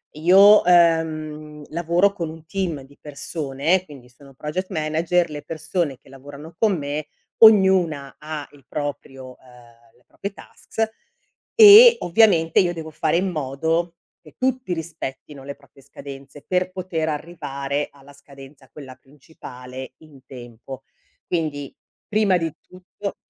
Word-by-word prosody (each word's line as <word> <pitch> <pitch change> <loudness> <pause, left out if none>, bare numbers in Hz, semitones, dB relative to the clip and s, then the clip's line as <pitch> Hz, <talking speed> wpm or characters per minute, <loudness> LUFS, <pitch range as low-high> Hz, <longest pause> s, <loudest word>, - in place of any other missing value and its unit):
io, 195 +6 +6
ehm, 155 -3 +1
lavoro 170 +4 +1
con 170 -5 -5
un 160 0 -12
team 175 -6 -3
di 140 +2 -18
persone, 150 +4 -2
quindi 135 -6 -14
sono 135 +2 -18
project 155 +7 -5
manager 165 +1 0
le 150 -1 -8
persone 160 -3 -3
che - - -22
lavorano 145 +4 -12
con 215 -4 +2
me, 145 +1 -4 0.3
ognuna 190 -10 +4
ha 155 -1 -7
il 145 -2 -20
proprio, 135 -3 -7
ehm, 120 -2 -20
le 125 - -30
proprie 200 0 -7
tasks 220 +2 -5 0.7
e 455 +2 +10
ovviamente 175 -4 +3
io 175 -2 +2
devo 160 -2 -7
fare 165 - 0
in 190 +2 0
modo 160 +3 -2 0.3
che 155 - -18
tutti 255 -6 -1
rispettino 150 -4 -7
le 140 - -7
proprie 140 -1 -22
scadenze 140 +1 -12
per 185 0 0
poter 175 -4 -3
arrivare 145 -3 -4
alla 140 0 -18
scadenza, 140 -1 -16
quella 130 -2 -11
principale, 130 -3 -12
in 150 -4 -18
tempo. 125 +1 -11 0.4
Quindi 150 -5 -3 0.3
prima 210 -3 +2
di 165 -3 -3
tutto 185 +2 -8
155 Hz, 135 wpm, -22 LUFS, 140-175 Hz, 0.7 s, e